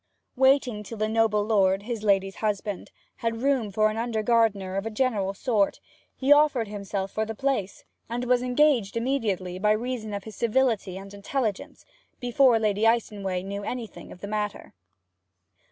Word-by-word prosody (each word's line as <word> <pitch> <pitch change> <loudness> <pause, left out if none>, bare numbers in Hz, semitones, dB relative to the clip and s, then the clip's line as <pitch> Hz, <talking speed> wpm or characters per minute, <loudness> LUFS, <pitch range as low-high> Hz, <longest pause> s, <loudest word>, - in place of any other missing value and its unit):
Waiting 265 -4 +3
till 220 +2 -8
the 215 0 0
noble 220 -2 +2
lord, 195 -3 +2
his 230 -1 -4
lady's 195 -2 +1
husband, 205 -2 -3 0.3
had 230 +1 -3
room 270 -6 +1
for 215 +2 +3
an 215 - -5
under 225 -2 -1
gardener 210 -5 +2
of 195 +3 -2
a - - -2
general 215 -4 0
sort, 210 -3 +1 0.4
he 275 +2 +5
offered 290 -6 +3
himself 200 -1 -4
for 220 - -1
the 220 0 -5
place, 235 -7 -2 0.3
and 240 +1 -3
was 250 0 +3
engaged 250 -4 +2
immediately 210 -8 -1
by 210 +2 +3
reason 225 -1 -3
of 200 - -5
his 220 0 -10
civility 230 -5 +1
and 195 +1 -10
intelligence, 210 +1 -3 0.3
before 245 0 +4
Lady 215 0 +1
Icenway 200 -5 0
knew 200 +1 -5
anything 235 +1 -6
of 180 - -12
the 200 - -5
matter. 210 0 -4
215 Hz, 165 wpm, -26 LUFS, 200-245 Hz, 0.4 s, he